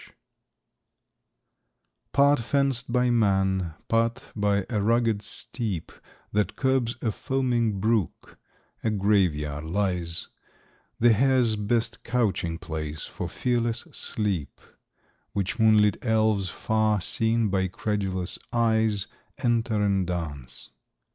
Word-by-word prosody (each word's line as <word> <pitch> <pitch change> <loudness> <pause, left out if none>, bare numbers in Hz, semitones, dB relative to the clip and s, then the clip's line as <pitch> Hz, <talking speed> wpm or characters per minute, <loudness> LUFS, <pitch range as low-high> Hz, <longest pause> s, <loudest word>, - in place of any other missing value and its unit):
] - - -14 2.1
Part 140 0 +4
fenced 130 0 0
by 125 0 +2
man, 95 -6 +1
part 115 +1 +1
by 100 -2 +1
a 110 -4 -1
rugged 115 -1 +2
steep 105 -5 -4 0.4
That 105 0 0
curbs 130 -3 +1
a 115 - +1
foaming 120 -5 0
brook, 110 -3 -1 0.4
a 110 - +2
Grave 100 -5 +2
yard 75 0 -4
lies; 90 -2 -1 0.7
The 120 0 +6
hare's 125 -1 +3
best 110 +2 -1
couching 100 -9 0
place 80 -2 -5
for - - -5
fearless 120 -1 -1
sleep; 95 -10 -3 0.7
Which 100 +3 -2
moonlit 110 -2 +4
elves, 110 -4 +2
far 110 +2 +1
seen 110 +3 +1
by 95 -1 +1
credulous 95 -2 -2
eyes, 110 -3 +2 0.3
Enter 115 -3 +1
in 95 -3 +1
dance. 75 -8 -6
105 Hz, 110 wpm, -26 LUFS, 95-115 Hz, 2.1 s, The